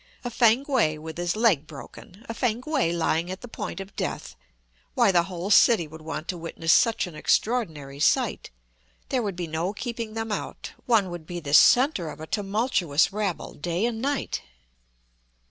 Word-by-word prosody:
A 245 - -4
Fankwae 235 - +3
with 160 +2 -8
his 175 +1 -1
leg 205 - +2
broken! 180 +7 -12
a 230 - -4
Fankwae 250 - 0
lying 170 0 0
at 185 +1 -6
the 245 - -8
point 210 -4 -6
of 195 +1 -9
death! - - -4 0.6
why, - - +4
the 175 -2 +4
whole 185 +2 -5
city 210 -5 +5
would 160 +1 -12
want 155 0 -6
to 180 - -3
witness 165 0 0
such 230 -2 +3
an 180 - -9
extraordinary 155 - -1
sight; 150 - +1 0.6
there 255 - +1
would 200 -5 -3
be 175 -1 -3
no 165 +4 -2
keeping 230 -1 -5
them 225 -1 -3
out; - - -5 0.2
one 215 -7 +3
would 170 -2 -8
be 175 -1 -5
the 145 -3 -6
centre 245 - +5
of - - -9
a 155 - -6
tumultuous 195 - +1
rabble 205 -4 -3
day 175 +6 -2
and 230 -2 -2
night! 280 +1 -2
190 Hz, 175 wpm, -25 LUFS, 165-230 Hz, 0.6 s, city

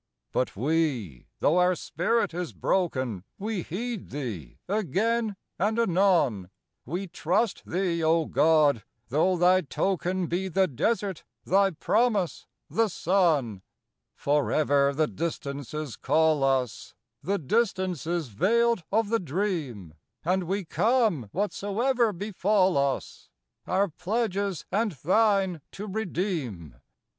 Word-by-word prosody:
But 130 - -1
we, 125 - -1
though 170 +5 +4
our 180 0 +4
spirit 175 +6 0
is 175 0 -4
broken, 130 - -1
We 210 -1 -3
heed 220 +6 -5
thee 110 - -6
again 215 +3 0 0.2
and 210 +5 +1
anon; 175 - +2 0.4
We 175 +7 -3
trust 180 +5 0
thee, 175 -2 0
O 160 0 +3
God, 150 -7 +3 0.3
though 170 +7 +2
thy 180 +2 +5
token 185 +2 -1
Be 180 +3 -2
the 190 +1 +2
desert, 195 - -1 0.2
thy 195 +1 +4
promise, 205 +1 0 0.2
the 225 0 +1
sun. 165 - +1 0.5
Forever 145 -1 +2
the 155 +3 +1
Distances 145 -3 -4
call 160 -3 +2
us— 130 -4 -1 0.3
The 200 +2 0
Distances 175 - -1
veiled 230 - +2
of 220 0 +2
the 230 0 +2
Dream; 155 - -3 0.3
And 185 +1 +1
we 195 +2 -2
come, 215 - +1
whatsoever 215 +5 0
befall 195 0 +1
us, 140 -1 -2 0.4
Our 195 +2 +2
pledges 200 0 -2
and 210 +1 +1
thine 190 - +2
to 205 - -6
redeem. 170 - -3
180 Hz, 115 wpm, -27 LUFS, 150-200 Hz, 0.5 s, thy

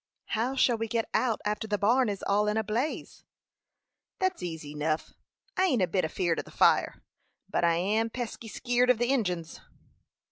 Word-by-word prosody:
"How 235 +4 0
shall 240 -3 +3
we 225 - -1
get 225 0 -1
out 235 -4 +1
after 210 +1 -1
the 205 -1 0
barn 235 +5 +3
is 200 -2 -4
all 205 +1 +2
in 210 +1 +1
a 220 - +1
blaze?" 235 +9 -3 0.9
"That's 375 -1 -1
easy 160 -4 -5
enough. 155 +1 -2 0.4
I 375 - +3
ain't 255 - +2
a - - +2
bit 185 +1 0
afeered 165 +1 0
of - - -5
the - - -13
fire, - - +2 0.4
but - - -1
I 170 -1 +4
am 210 +6 +1
pesky 235 -1 -6
skeered 245 +3 +1
of 250 - +5
the 240 +2 0
Injins." 180 -11 -1
215 Hz, 185 wpm, -28 LUFS, 180-245 Hz, 0.9 s, of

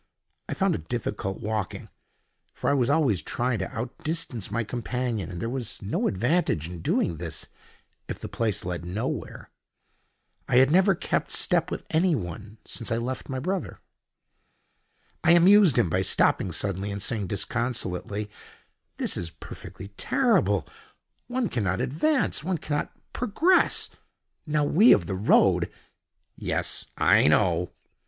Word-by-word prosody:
I - - -2
found - - +2
it 80 - -6
difficult 105 -5 -3
walking, 105 -3 -3 0.7
for - - 0
I - - +3
was 130 -3 +2
always 140 - +2
trying 120 -2 -1
to 95 - -3
out 120 +3 -5
distance 155 - -2
my 115 - -1
companion, 120 -1 -3
and 90 -2 -6
there 115 - -2
was 125 -2 -4
no 100 +1 -1
advantage 115 - +1
in 85 -1 -8
doing 85 0 0
this 80 -1 -4 0.6
if - - -4
the - - -7
place 110 -6 -1
led 90 -1 -3
nowhere. 90 +6 -4 1.0
I - - +2
had 130 +2 +6
never 190 +2 +5
kept - - -1
step - - +1
with - - -5
anyone 110 - -1
since 115 - -4
I 115 - +1
left 125 +3 -4
my 130 - -3
brother. 185 +8 -3 1.4
I 170 - +6
amused 180 - +6
him - - +4
by 90 +3 +1
stopping 95 0 +2
suddenly 95 +3 -2
and 100 0 -4
saying 110 -1 -2
disconsolately, 105 -1 -1 0.7
"This - - -2
is 85 - -4
perfectly 95 +3 -10
terrible. 105 - +2 0.6
One 245 -1 -1
cannot 95 - -1
advance: 255 - 0
one 180 +1 -1
cannot 150 -1 -2 0.2
progress. 310 - +2 0.6
Now 150 0 +1
we 195 +11 +6
of 85 - +2
the 95 - -3
road——" 100 +4 +3 0.7
"Yes. - - -2
I - - +5
know." - - +3
115 Hz, 145 wpm, -26 LUFS, 95-155 Hz, 1.4 s, had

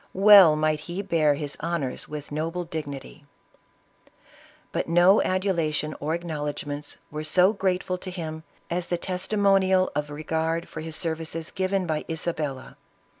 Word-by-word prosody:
Well 195 -5 +9
might 155 0 +1
he 185 +4 -3
bear 160 -6 +2
his 145 -1 -4
honors 160 -7 -3
with 150 -1 -7
noble 165 +4 -2
dignity! 150 -3 -7 1.5
But - - -2
no 175 +4 +6
adulation 165 -5 0
or 155 +3 -1
acknowledgments 150 -3 -5
were 150 +1 -4
so 180 +6 +4
grate 185 -3 0
ful 185 0 -3
to 185 - -6
him 160 -3 -5 0.3
as 175 0 -1
the 175 - -1
testimonial 190 0 +2
of 150 0 -2
regard 160 +2 -2
for 155 - -7
his 160 0 -5
services 160 -1 -3
given 190 0 -1
by 155 -2 -2
Isabella. 155 -5 -4
165 Hz, 140 wpm, -25 LUFS, 150-185 Hz, 1.5 s, Well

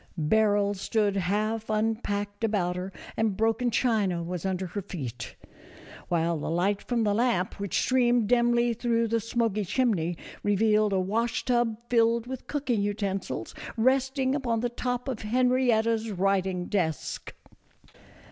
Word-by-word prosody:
Barrels 205 +3 +2
stood 210 -2 +1
half 210 +4 -1
unpacked 215 -1 -1
about 195 -5 +1
her, 185 +2 -4 0.2
and 220 -3 0
broken 225 +2 +1
china 210 -8 +1
was 180 +1 -3
under 190 0 -2
her 185 +3 -4
feet, 130 - -6 0.7
while 170 -1 0
the - - -4
light 190 +5 +1
from 240 -2 -1
the 205 -1 +2
lamp, 215 -5 0
which 200 -3 -1
streamed 245 -3 +3
dimly 240 0 +3
through 230 0 0
the 230 +1 +1
smoky 225 -2 -1
chimney, 180 -6 0 0.2
revealed 210 +1 +2
a 190 - +2
wash 225 +5 -1
tub 240 -3 +1
filled 230 -1 +3
with 260 0 -7
cooking 265 -7 -1
utensils 200 -1 -3 0.2
resting 265 +2 +2
upon 240 -5 0
the 245 - 0
top 245 +1 -3
of 255 -4 -3
Henrietta's 230 -1 +2
writing 190 -2 0
desk. 170 -7 -2
215 Hz, 140 wpm, -27 LUFS, 195-235 Hz, 0.7 s, streamed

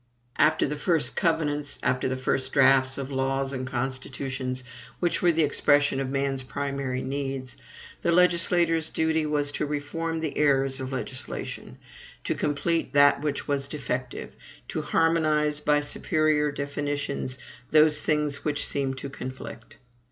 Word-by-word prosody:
After 155 - +4
the 150 - -2
first 165 0 0
covenants, 150 -3 0
after 130 0 +1
the 130 - -2
first 130 0 -1
draughts 135 -1 +5
of 135 0 -5
laws 135 0 -1
and 130 -1 -4
constitutions, 130 0 -4 0.4
which 175 -2 0
were 175 - +5
the 165 -1 +2
expression 145 -1 +3
of 135 -1 -2
man's 135 0 -1
primary 135 -1 -3
needs, 135 -2 -4 0.5
the 170 - +1
legislator's 170 -2 +3
duty 160 -1 +1
was 145 -1 0
to 150 - -2
reform 160 +3 -3
the 160 -3 -3
errors 135 -2 +2
of 130 0 -5
legislation; 130 0 -5 0.5
to - - 0
complete 160 +3 -1
that 145 0 +5
which 145 -1 -2
was 140 -1 0
defective; 130 -4 -4 0.3
to - - -2
harmonize, 155 -2 +2
by 150 0 +2
superior 150 0 +1
definitions, 140 -2 -3 0.3
those 155 -1 +6
things 150 -2 +1
which 150 -1 0
seemed 135 -2 -1
to 140 - -5
conflict. 130 -4 -8
145 Hz, 140 wpm, -26 LUFS, 135-155 Hz, 0.5 s, those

